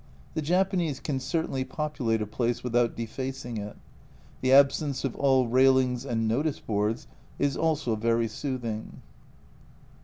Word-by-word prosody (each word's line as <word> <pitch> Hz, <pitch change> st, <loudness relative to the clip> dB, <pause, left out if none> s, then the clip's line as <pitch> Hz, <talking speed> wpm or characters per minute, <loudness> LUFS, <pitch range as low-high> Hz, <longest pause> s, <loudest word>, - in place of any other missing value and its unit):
The 155 Hz, -, -1 dB
Japanese 175 Hz, -2 st, +1 dB
can 140 Hz, -3 st, -2 dB
certainly 135 Hz, -2 st, -1 dB
populate 130 Hz, -7 st, -1 dB
a -, -, -3 dB
place 120 Hz, +3 st, -2 dB
without 120 Hz, -1 st, +1 dB
defacing 120 Hz, +1 st, -5 dB
it. 105 Hz, 0 st, -6 dB, 0.6 s
The 130 Hz, -, +2 dB
absence 140 Hz, +1 st, +4 dB
of 135 Hz, -4 st, -2 dB
all 130 Hz, -3 st, +3 dB
railings 130 Hz, 0 st, +3 dB
and 115 Hz, -3 st, 0 dB
notice 140 Hz, +7 st, 0 dB
boards 105 Hz, +1 st, -1 dB, 0.3 s
is 140 Hz, -2 st, +1 dB
also 150 Hz, -7 st, 0 dB
very 115 Hz, +1 st, +1 dB
soothing. 115 Hz, -3 st, -5 dB
130 Hz, 130 wpm, -27 LUFS, 115-140 Hz, 0.6 s, absence